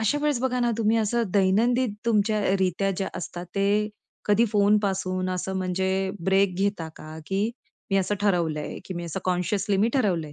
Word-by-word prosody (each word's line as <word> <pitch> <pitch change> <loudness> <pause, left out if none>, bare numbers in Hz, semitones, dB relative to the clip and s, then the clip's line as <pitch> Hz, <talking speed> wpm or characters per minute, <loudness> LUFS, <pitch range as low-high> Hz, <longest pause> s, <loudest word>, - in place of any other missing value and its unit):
अशा 220 +7 +1
वेळेस 295 -4 +1
बघा 250 -1 0
ना, 240 -1 +2
तुम्ही 225 0 +2
असं 225 +2 +1
दैनंदिन 220 +5 +3
तुमच्या 215 -1 +2
अ, - - +3
रित्या 190 +1 +1
ज्या 195 0 -2
असतात 175 0 -6
ते 205 +1 +2 0.4
कधी 210 +3 +4
फोनपासून 200 -3 +1
असं 185 +1 -3
म्हणजे 190 +1 0
ब्रेक 190 0 +3
घेता 195 -3 -1
का, 155 +1 -9
की 200 +3 0 0.4
मी 195 - +3
असं 195 +1 +1
ठरवलंय, 170 -7 0
की 185 - -6
मी 175 0 -4
असं 170 +3 -4
कॉन्शियसली 185 +2 0
मी 210 +4 +3
ठरवलंय 175 - 0
195 Hz, 175 wpm, -25 LUFS, 185-210 Hz, 0.4 s, कधी